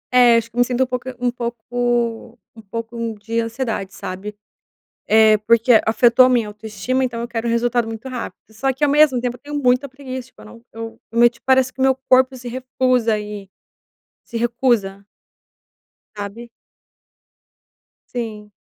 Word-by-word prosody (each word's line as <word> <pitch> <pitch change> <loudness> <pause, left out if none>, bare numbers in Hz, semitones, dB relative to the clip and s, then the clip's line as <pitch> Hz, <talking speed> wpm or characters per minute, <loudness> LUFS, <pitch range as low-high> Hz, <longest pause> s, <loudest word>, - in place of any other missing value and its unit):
É, 240 -2 +7
acho 230 0 -2
que - - -23
eu - - -2
me - - +7
sinto 250 +1 +1
um - - 0
pouco 255 0 -4
um 245 0 +1
pouco 240 0 -2 0.2
um 225 - -12
pouco 230 +1 -4
de 225 +3 -3
ansiedade, 230 -4 -3
sabe, 200 +3 -7 0.7
eh, 220 0 +6
porque 230 +2 +4
afetou 235 +2 +5
a - - +5
minha 235 -4 +2
autoestima, 215 +5 -3
então 240 -2 -3
eu 235 - -4
quero 235 -1 -3
um - - +1
resultado 235 0 +1
muito 225 +3 -7
rápido. 250 -2 -6
Só 265 +5 -1
que, 265 - -13
ao 295 - +5
mesmo 290 -3 +4
tempo, 245 0 -2
eu - - -27
tenho 290 0 -4
muita 255 +2 +2
preguiça, 260 -2 -7
tipo - - -21
eu - - -13
não 230 - -14
eu 225 0 -8
o 230 - -2
meu 240 0 +8
ti 235 0 -19
parece 260 -1 +3
que 255 - -12
o - - +2
meu 265 0 +4
corpo 260 +1 +5
se 250 -1 -8
recusa, 250 -2 0
e 210 -2 -8 0.8
se 235 - -7
recusa. 230 -4 0 1.1
Sabe. 205 +4 -7 1.7
Sim. 215 -3 -5
235 Hz, 180 wpm, -20 LUFS, 225-255 Hz, 1.7 s, meu